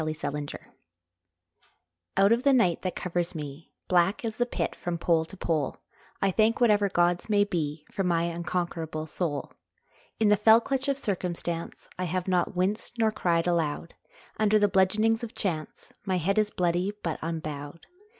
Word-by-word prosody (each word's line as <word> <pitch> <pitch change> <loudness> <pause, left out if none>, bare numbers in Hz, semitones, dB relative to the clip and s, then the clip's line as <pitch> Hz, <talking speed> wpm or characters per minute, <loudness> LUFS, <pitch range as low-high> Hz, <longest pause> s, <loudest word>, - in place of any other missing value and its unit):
Y 155 0 -1
Z 155 - -3
Invictus 145 0 -5 1.6
OUT 195 +2 +5
of 235 +1 +4
the 280 +1 +4
night 185 -10 +3
that 185 - -3
covers 175 -1 -2
me, 150 0 -7 0.2
Black 180 +5 +2
as 220 -1 -3
the 245 - +1
Pit - - -2
from 175 -1 -3
pole 165 -1 +2
to 195 +4 -12
pole, 155 -6 -1 0.5
I 195 - +3
thank 220 +4 +2
whatever 210 -4 +4
gods 175 +1 +1
may 205 -1 +4
be 155 -6 -3
For 195 - -1
my 170 -2 +2
unconquerable 170 -2 -3
soul. 160 -2 -3 0.7
In 220 -2 +4
the 210 - +5
fell 220 +2 +7
clutch 270 +3 -2
of 275 -1 +1
circumstance 175 -7 -3
I 185 - 0
have 180 +2 -2
not 180 0 +1
winced 200 +6 -1
nor 220 -1 +3
cried 170 -6 +1
aloud, 165 -2 -1 0.4
Under 215 0 +4
the 205 -1 +4
bludgeonings 215 +4 +2
of 235 - -6
chance 160 -7 -4
My 190 -2 0
head 195 +5 +1
is 210 -1 +2
bloody, 180 +1 0
but 165 -3 -2
unbowed. 155 -1 -5
180 Hz, 170 wpm, -27 LUFS, 165-210 Hz, 1.6 s, fell